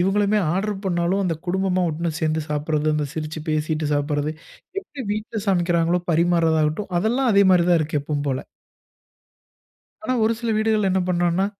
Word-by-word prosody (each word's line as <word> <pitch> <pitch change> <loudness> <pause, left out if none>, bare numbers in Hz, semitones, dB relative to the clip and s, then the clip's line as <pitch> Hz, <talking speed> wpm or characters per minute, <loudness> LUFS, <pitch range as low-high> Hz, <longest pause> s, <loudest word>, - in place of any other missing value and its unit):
இவங்களுமே 200 +3 +2 0.2
order 205 +2 -1
பண்ணாலும் 175 +2 +1
அந்த 170 -3 0
குடும்பமா 185 0 0
ஒட்டுனா 165 +2 -2
சேர்ந்து 155 0 0
சாப்பிடுறது. 150 +1 0
அந்த 150 -1 -1
சிரிச்சு 155 0 -4
பேசிட்டு 155 0 -1
சாப்பிடுறது. 145 +1 -1 0.5
எப்படி 295 -8 -8
வீட்டுல 215 +1 -4
சமைக்கிறாங்களோ 175 -1 +2
பரிமாறதா 165 -1 +3
ஆகட்டும் 180 +6 -3
அதெல்லாம் 240 +6 +1
அதே 200 0 +5
மாரி 175 -2 +4
தான் 170 - +5
இருக்கு 150 -1 -1
எப்பவும் 145 0 -3
போல. 130 -1 -2 1.6
ஆனா 255 - 0
ஒரு 220 - +3
சில 235 -1 -1
வீடுகள்ல 215 -2 +2
என்ன 190 - +2
பண்றாங்கனா 175 +1 +1
175 Hz, 155 wpm, -22 LUFS, 155-200 Hz, 1.6 s, அதே